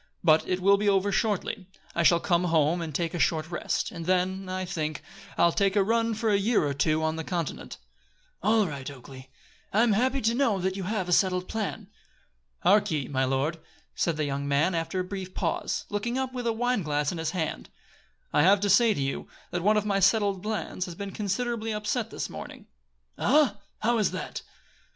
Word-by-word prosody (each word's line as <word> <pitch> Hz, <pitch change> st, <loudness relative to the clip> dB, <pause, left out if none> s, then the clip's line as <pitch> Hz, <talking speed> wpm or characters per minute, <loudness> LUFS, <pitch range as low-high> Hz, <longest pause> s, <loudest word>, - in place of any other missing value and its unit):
But 160 Hz, -2 st, +4 dB
it 185 Hz, 0 st, -1 dB
will 200 Hz, +2 st, +5 dB
be 205 Hz, 0 st, +1 dB
over 200 Hz, 0 st, +2 dB
shortly. 200 Hz, -2 st, -1 dB, 0.3 s
I 170 Hz, -, 0 dB
shall 170 Hz, 0 st, +5 dB
come 175 Hz, 0 st, +1 dB
home 165 Hz, 0 st, +2 dB
and 160 Hz, -2 st, -4 dB
take 170 Hz, 0 st, -1 dB
a 175 Hz, -, -3 dB
short 160 Hz, +1 st, +1 dB
rest, 175 Hz, -, -2 dB
and 165 Hz, -1 st, -7 dB
then, 185 Hz, +1 st, 0 dB
I 185 Hz, 0 st, -2 dB
think, 155 Hz, -5 st, -3 dB, 0.3 s
I'll 170 Hz, -, +5 dB
take 195 Hz, +2 st, +1 dB
a 200 Hz, -, +4 dB
run 230 Hz, +2 st, +1 dB
for 220 Hz, 0 st, 0 dB
a 200 Hz, -, +3 dB
year 210 Hz, -4 st, +2 dB
or 145 Hz, -, -1 dB
two 155 Hz, +3 st, +1 dB
on 160 Hz, 0 st, 0 dB
the 160 Hz, -, -3 dB
continent." 170 Hz, -2 st, -4 dB, 0.6 s
"All 220 Hz, -1 st, +3 dB
right, 140 Hz, -6 st, -5 dB
Oakleigh. 130 Hz, -1 st, -12 dB, 0.4 s
I 215 Hz, +3 st, +4 dB
am 240 Hz, -, +3 dB
happy 260 Hz, +6 st, +1 dB
to 225 Hz, +2 st, +2 dB
know 240 Hz, -5 st, +2 dB
that 190 Hz, 0 st, -1 dB
you 195 Hz, -2 st, -4 dB
have 200 Hz, -2 st, -2 dB
a -, -, -3 dB
settled 180 Hz, 0 st, +2 dB
plan." 220 Hz, -2 st, -4 dB, 0.7 s
"Hark 205 Hz, +1 st, +4 dB
ye, 150 Hz, -5 st, -2 dB
my 130 Hz, -1 st, +1 dB
lord," 135 Hz, +5 st, -1 dB, 0.3 s
said 170 Hz, -3 st, 0 dB
the 155 Hz, -, 0 dB
young 140 Hz, 0 st, -3 dB
man, 145 Hz, +6 st, +2 dB
after 165 Hz, +3 st, -2 dB
a -, -, 0 dB
brief 185 Hz, 0 st, -7 dB
pause, -, -, -2 dB
looking 230 Hz, +5 st, -2 dB
up 260 Hz, -1 st, -2 dB
with 245 Hz, -2 st, -3 dB
a -, -, +3 dB
wine 245 Hz, 0 st, 0 dB
glass 150 Hz, -2 st, 0 dB
in 175 Hz, -, -5 dB
his 160 Hz, -, -1 dB
hand, 165 Hz, -4 st, -3 dB, 0.6 s
"I -, -, +4 dB
have 195 Hz, +5 st, +5 dB
to 205 Hz, -1 st, +2 dB
say 220 Hz, +2 st, +5 dB
to -, -, -2 dB
you, 135 Hz, -, -3 dB, 0.2 s
that 175 Hz, -, -2 dB
one 210 Hz, +4 st, +3 dB
of 210 Hz, -, 0 dB
my 200 Hz, -2 st, +1 dB
settled 195 Hz, -1 st, +3 dB
plans 210 Hz, -3 st, -3 dB
has 175 Hz, -3 st, -8 dB
been 200 Hz, +2 st, -6 dB
considerably 220 Hz, +3 st, -2 dB
upset 210 Hz, +2 st, -2 dB
this -, -, -4 dB
morning." -, -, -9 dB, 0.5 s
"Ah, 270 Hz, -7 st, +3 dB, 0.2 s
how 235 Hz, +1 st, +2 dB
is 210 Hz, -, +2 dB
that?" -, -, -5 dB
190 Hz, 210 wpm, -27 LUFS, 165-210 Hz, 0.7 s, will